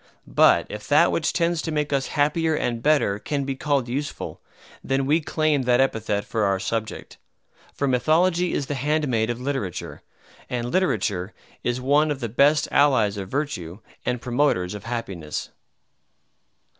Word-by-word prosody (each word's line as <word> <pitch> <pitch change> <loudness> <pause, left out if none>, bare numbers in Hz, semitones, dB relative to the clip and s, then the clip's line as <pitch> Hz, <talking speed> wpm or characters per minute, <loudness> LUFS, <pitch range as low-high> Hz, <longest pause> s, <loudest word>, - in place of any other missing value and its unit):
But - - +4
if - - -8
that - - +5
which - - 0
tends 170 -1 0
to 165 - -4
make 150 -1 -1
us 135 -1 0
happier 160 +2 +2
and 120 -5 -2
better 140 -8 +2
can 140 +4 -2
be 135 0 -3
called 140 -2 0
useful, 140 +4 -4 0.4
then 135 0 0
we 155 +4 +2
claim 155 -2 +1
that 125 -1 +2
epithet 110 -6 0
for 110 -2 -1
our 100 -1 +1
subject. 110 +2 -4 0.6
For 140 - -1
Mythology 165 +8 +2
is 140 - -1
the 145 - -3
handmaid 135 -5 0
of 120 0 -2
literature; 130 - -4 0.5
and 120 -1 -3
literature 105 - 0 0.3
is 120 +1 -1
one 145 +4 +3
of 145 -3 -2
the 120 -3 -3
best 140 +6 +3
allies 130 -8 +3
of 95 -2 -6
virtue 100 - -3 0.3
and 125 0 -1
promoters 120 -7 0
of 105 0 -8
happiness. 100 -10 -5
135 Hz, 155 wpm, -24 LUFS, 115-150 Hz, 0.6 s, that